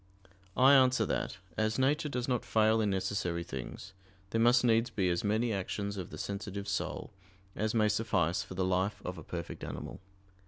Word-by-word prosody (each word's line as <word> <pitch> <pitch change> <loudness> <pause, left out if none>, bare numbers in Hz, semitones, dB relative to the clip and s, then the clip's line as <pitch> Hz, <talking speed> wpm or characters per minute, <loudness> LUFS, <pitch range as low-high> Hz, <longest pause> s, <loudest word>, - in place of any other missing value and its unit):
I 130 +2 +7
answer 130 -2 +5
that, - - -2 0.2
As 110 0 +1
nature 145 +3 +2
does 125 -3 -2
not 125 -3 0
fail 110 0 +3
in 105 - +1
necessary 95 -3 -1
things, 75 +6 -7 0.4
there 115 - +1
must 120 +1 +5
needs 115 0 +3
be 95 -3 0
as 85 - -1
many 110 +3 +1
actions 100 +1 -3
of 95 -3 -5
the - - -8
sensitive 100 0 -5
soul 100 -1 -3 0.4
as 110 +2 -1
may 110 -1 +4
suffice 95 -6 +1
for 95 - -8
the 95 0 0
life 95 +2 0
of 90 -1 -4
a - - -9
perfect 85 +1 -6
animal. - - -6
105 Hz, 185 wpm, -31 LUFS, 95-115 Hz, 0.4 s, I